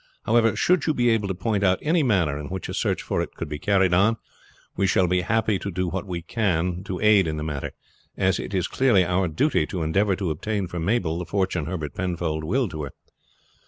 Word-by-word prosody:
However, 115 0 +3
should 180 -3 +2
you 155 - +2
be 120 0 +3
able 110 -3 +1
to 95 - -2
point 100 +2 -1
out 95 -1 +3
any 165 +2 +2
manner 90 - +1
in 75 - -6
which 95 +2 -5
a - - -5
search - - -1
for - - -1
it - - -6
can - - -5
be 75 0 -5
carried 95 0 +2
on, 100 +6 +3 0.6
we 100 - +1
shall 95 0 +3
be 90 +1 +2
happy 110 +1 +1
to 100 - -4
do 90 0 -2
what 95 +2 -4
we 85 -2 -4
can 90 -3 -1
to 90 -2 -4
aid 105 -4 +5
in 80 -1 -2
the 75 - -3
matter, 75 -3 -4 0.4
as 95 -1 +1
it - - -5
is 95 -3 0
clearly 115 -9 +3
our 90 +1 +1
duty 80 - +1
to 90 -3 -3
endeavor 100 +5 +2
to 90 -3 -2
obtain 100 +6 -2
for 90 0 -5
Mabel 85 -3 0
the 90 - -4
fortune 90 -3 -1
Herbert 80 -5 -4
Penfold 85 -4 -2
willed 110 +5 0
to 80 -2 -5
her. 70 - -9
95 Hz, 235 wpm, -24 LUFS, 85-105 Hz, 0.6 s, aid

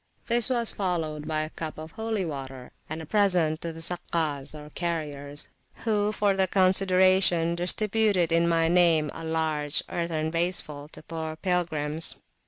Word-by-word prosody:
This 235 0 +3
was 235 -3 +2
followed 160 -6 -3
by 155 -1 -1
a 155 +1 -5
cup 160 -2 -6
of 155 +1 -8
holy 220 -2 -2
water 135 -4 -7 0.2
and 160 +1 -5
a - - -8
present 175 -5 +2
to 170 - -3
the 165 0 -5
Sakkas, 160 -5 -1
or 150 0 -11
carriers, 145 -4 -2 0.4
who 210 -2 +1
for 205 -1 +1
the 190 -1 +3
consideration 185 -2 +3
distributed, 195 0 +2
in 170 +1 +3
my 165 -1 +2
name, 165 -3 +3
a 165 - -8
large 160 -2 0
earthen 160 -2 -2
vaseful 165 -4 -1
to - - -10
poor 160 -1 -5
pilgrims. 165 -3 0
165 Hz, 155 wpm, -26 LUFS, 155-185 Hz, 0.4 s, This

